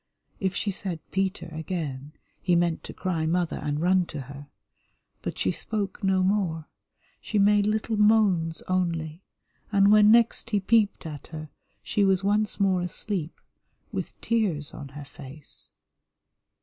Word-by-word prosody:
If 190 -2 -1
she 200 - 0
said 185 -3 -4
"Peter" 195 0 -1
again, 155 -4 -4 0.3
he 180 -2 +2
meant 170 -1 +1
to - - -7
cry 165 -4 -2
"Mother" 175 0 0
and 145 0 -2
run 180 +1 +3
to 150 - -6
her. 140 +2 -10 0.7
But - - -4
she - - +1
spoke 205 -1 -4
no 190 -1 +3
more, 185 -5 0 0.5
she 215 - -2
made 205 0 +4
little 220 +1 0
moans 205 -6 +3
only, 170 -3 -1 0.5
and 200 -1 +5
when 210 0 +7
next 230 0 +4
he 210 -2 +2
peeped 205 -1 +2
at 150 -3 -7
her 155 -1 -8 0.3
she 205 - +1
was 195 -1 +3
once 210 +2 +1
more 190 -2 +3
asleep, 180 -1 -4 0.5
with - - -5
tears 190 -11 0
on 140 - -8
her 145 - -7
face. 140 +1 -11
185 Hz, 150 wpm, -26 LUFS, 160-205 Hz, 0.7 s, when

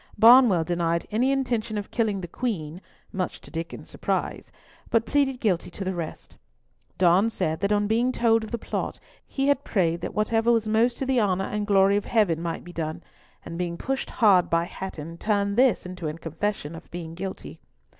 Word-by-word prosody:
Barnwell 225 -5 +7
denied 170 0 0
any 245 +5 +2
intention 235 -5 -1
of 205 - -5
killing 215 -4 0
the 175 - -6
Queen 175 -6 -4 0.3
(much 185 -2 -3
to - - -14
Diccon's 165 +1 -6
surprise), - - -3 0.4
but 230 0 +2
pleaded 270 -1 +1
guilty 190 -8 0
to 195 - -6
the 190 0 -2
rest. 170 -3 -7 0.6
Donne 185 +4 +4
said 160 -7 -2
that 200 +1 0
on 205 0 +2
being 230 +4 +2
told 225 -2 +2
of 220 - -7
the 235 - -2
plot - - -4 0.3
he 270 0 -1
had 285 -1 +2
prayed 170 -4 0
that - - -5
whatever 225 +2 +2
was 225 -2 +2
most 230 +3 +2
to 270 - -2
the 260 -2 +2
honour 190 -2 +1
and 210 0 -3
glory 200 0 +4
of 205 - -3
Heaven 195 -8 +2
might 170 -1 -4
be 175 - -11
done, 160 +1 -4 0.4
and 170 0 -6
being 170 -1 -2
pushed 270 +6 -3
hard 200 -6 +4
by 170 0 +2
Hatton, 170 -2 -7
turned 200 -1 0
this 250 -5 +3
into 180 -3 -5
a 155 - -3
confession 165 0 -3
of 165 - -11
being 170 -2 -7
guilty. 190 +2 -7
200 Hz, 195 wpm, -25 LUFS, 170-230 Hz, 0.6 s, Barnwell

